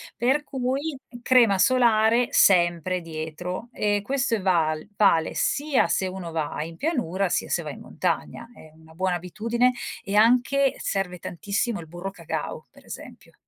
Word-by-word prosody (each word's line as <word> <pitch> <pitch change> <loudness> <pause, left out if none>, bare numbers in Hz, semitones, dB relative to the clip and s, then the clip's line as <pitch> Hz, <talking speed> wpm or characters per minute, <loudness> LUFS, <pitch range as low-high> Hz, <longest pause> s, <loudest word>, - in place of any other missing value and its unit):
per 265 +5 +1
cui 275 +2 -3 0.2
crema 235 -6 +4
solare 235 0 +4
sempre 175 - +3
dietro 165 +6 -6
e 205 -1 0
questo 260 0 0
è 210 - -4
val 165 -3 +1
vale 195 -6 +3
sia 290 -2 +1
se 190 - 0
uno 185 -2 -6
va 155 -2 -3
in 165 +1 -9
pianura, 200 - -1
sia - - -1
se - - 0
va - - -5
in - - -11
montagna, - - -3
è 155 - -15
una 160 0 -18
buona 185 +2 0
abitudine. 230 +8 0 0.3
E 200 - -3
anche, 250 +5 +4
serve 180 -2 -2
tantissimo, 200 +7 -2
il 160 - -12
burro 175 +4 -6
cacao 170 -4 -5
per - - -20
esempio. - - -11
195 Hz, 155 wpm, -25 LUFS, 175-245 Hz, 0.3 s, crema